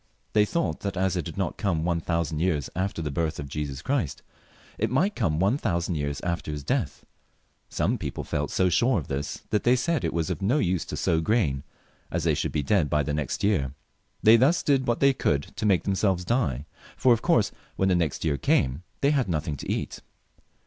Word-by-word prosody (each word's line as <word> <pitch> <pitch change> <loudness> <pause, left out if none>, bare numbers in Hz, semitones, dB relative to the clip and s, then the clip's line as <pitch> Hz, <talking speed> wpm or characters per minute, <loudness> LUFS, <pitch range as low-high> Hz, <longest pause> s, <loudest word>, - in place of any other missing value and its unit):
They 105 -1 +5
thought 170 +9 -1
that 100 -2 -4
as 95 0 +1
it 85 -4 -2
had - - -8
not - - -2
come 85 -6 0
one 85 -1 +1
thousand 85 -3 -1
years 80 -5 0
aft^r 95 -2 -2
the 75 - -2
birth 80 +2 -1
of 70 - -5
Jesus 70 -1 -4
Christ, 130 - -1 0.6
it - - +1
might 175 - +1
come 80 -10 0
one 100 +10 +2
thousand 85 - -1
years 70 -2 -2
after 85 -2 -3
His 75 -1 -5
death. - - -2 0.6
Some - - 0
people - - -4
felt 75 0 -2
so 95 - +2
sure 120 +7 +3
of 75 - -4
this, 70 +1 -4
that 105 - +2
they 120 +1 +5
said 155 +5 0
it - - 0
was 80 -2 -1
of - - -4
no 110 +9 +2
use 90 - 0
to - - -5
sow 80 -1 +1
corn, 80 - +1 0.5
as 85 -1 -2
they 80 -2 +3
should - - -1
be 75 - -1
dead 80 0 +2
by 75 0 +2
the 75 - -2
next 75 -4 -2
year. 75 -10 +1 0.5
They 110 +2 +8
thus 145 +8 +3
did 135 -3 +2
what 120 0 0
they 140 0 +5
could 95 - -1
to 105 - -1
make 95 -4 +3
themselves 95 -2 +1
die, 75 - 0 0.3
for 130 -2 +5
of 115 - -1
course 145 - +3 0.2
when 95 - +1
the 90 - +3
next 85 -3 -1
year 75 -3 +1
came, 65 +2 +1 0.2
they 140 - +4
had 135 -9 +1
nothing 75 -2 -1
to - - -4
eat. - - -3
90 Hz, 220 wpm, -26 LUFS, 75-110 Hz, 0.6 s, They